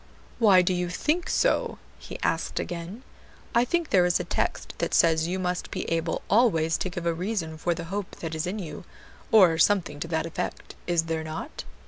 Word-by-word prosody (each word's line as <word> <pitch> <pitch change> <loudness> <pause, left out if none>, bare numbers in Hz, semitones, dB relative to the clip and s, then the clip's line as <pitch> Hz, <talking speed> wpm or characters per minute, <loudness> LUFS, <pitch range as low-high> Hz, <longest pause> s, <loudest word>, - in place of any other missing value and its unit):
"Why 195 -6 +6
do 185 - +1
you 180 -1 -1
think 305 - -1
so?" - - +1 0.2
he - - -8
asked - - 0
again, 175 +7 -6 0.5
"I 235 - +4
think 335 +5 -1
there 180 -2 +5
is 175 - +2
a - - -2
text - - -2
that - - 0
says 160 -1 +4
you 180 +2 -1
must 180 -1 -2
be - - -3
able 165 0 -1
always 170 -8 +3
to 185 - -2
give 175 -2 -6
a 170 - +2
reason 175 -2 -3
for 170 +2 -1
the 170 - -5
hope 205 -2 -4
that 165 -1 -6
is 160 +2 -2
in 195 +4 -3
you, 160 -7 -7 0.5
or 180 -7 +6
something 175 -7 +2
to 165 - -4
that 160 -1 -1
effect, 165 - -5
is 170 -2 +2
there 165 -1 -2
not?" 160 +1 -6
175 Hz, 200 wpm, -26 LUFS, 165-195 Hz, 0.5 s, Why